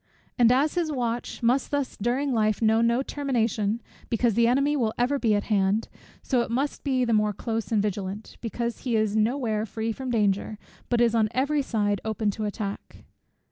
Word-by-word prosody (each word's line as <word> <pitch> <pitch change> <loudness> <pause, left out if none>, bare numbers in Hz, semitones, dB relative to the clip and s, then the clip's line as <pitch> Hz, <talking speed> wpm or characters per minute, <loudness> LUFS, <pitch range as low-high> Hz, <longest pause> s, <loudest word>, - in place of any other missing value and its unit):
And 240 -2 +5
as 280 +4 +3
his 340 -3 0
watch 240 -3 -3
must 250 +4 +2
thus 285 -2 -2
during 255 +5 0
life 215 -2 +1
know 220 0 +3
no 235 +3 +2
termination, 230 -6 -1 0.3
because 230 0 +2
the 235 +2 +3
enemy 275 +4 +2
will 225 -6 0
ever 260 +4 +1
be 220 -4 +2
at 205 - 0
hand; 205 +1 +1 0.3
so 255 -3 +1
it 235 - -3
must 270 +5 -2
be 260 -3 +1
the 235 - +1
more 210 -1 +2
close 225 0 -3
and 210 -2 +2
vigilant, 200 0 -4
because 235 0 -3
he 245 -3 -1
is 215 -1 +1
no 220 +5 +2
where 220 -5 -1
free 225 +1 -3
from 260 +3 -5
danger, 210 -2 0 0.3
but 240 -1 +2
is 235 -1 +4
on 220 -2 +2
every 285 +3 +1
side 205 -6 0
open 220 -1 -1
to 215 +2 -4
attack. 205 -1 -5
230 Hz, 195 wpm, -26 LUFS, 215-255 Hz, 0.3 s, And